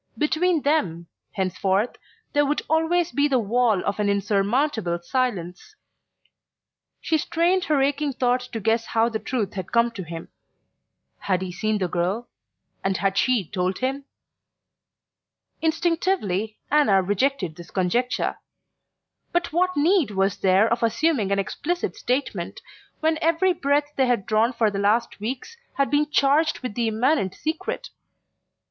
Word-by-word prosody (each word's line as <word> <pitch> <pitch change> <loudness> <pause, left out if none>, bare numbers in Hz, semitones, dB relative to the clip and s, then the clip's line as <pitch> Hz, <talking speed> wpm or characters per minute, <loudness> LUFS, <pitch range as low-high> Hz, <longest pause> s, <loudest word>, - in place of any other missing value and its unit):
Between 320 +1 +1
them, 185 - 0 0.3
henceforth, 190 +3 0 0.4
there 290 - +4
would 290 +1 0
always 325 +2 +1
be 285 +1 +2
the 270 -3 +2
wall 225 -2 +1
of 200 +1 -2
an 205 -1 +1
insurmountable 200 - +1
silence...She 195 - -5
strained 340 +4 +1
her 300 -3 +2
aching 285 +1 0
thoughts 250 0 0
to 230 - -5
guess 225 +2 +1
how 230 +1 +2
the 220 -2 -3
truth 230 -5 -2
had 190 -3 -6
come 235 0 +3
to 215 -4 -7
him. 165 -1 -8 0.9
Had 185 -2 0
he 185 - -5
seen 215 +4 -1
the 185 -3 -1
girl, 185 +7 -1 0.6
and 195 -1 0
had 195 -1 0
she 235 -5 +2
told 185 -1 -1
him? 270 +2 -2 1.6
Instinctively, 320 - 0
Anna 245 -11 +4
rejected 205 - 0
this 170 0 -11
conjecture. 220 +7 0 0.9
But 345 -2 -1
what 365 0 +1
need 330 - +3
was 195 0 0
there 195 +2 +4
of 235 +1 0
assuming 230 -2 +1
an 200 - +2
explicit 325 - -2
statement, 255 +3 -2 0.4
when 315 0 +1
every 335 +3 +3
breath 290 -1 0
they 265 -1 +3
had 235 -6 +1
drawn 220 +3 +2
for 225 -4 +1
the 200 - -3
last 210 +4 +1
weeks 260 - -5 0.2
had 275 0 +1
been 295 +1 +2
charged 295 +2 +2
with 250 -5 -4
the 235 +1 0
immanent 220 -2 +1
secret? 315 +1 -4
235 Hz, 140 wpm, -24 LUFS, 200-295 Hz, 1.6 s, there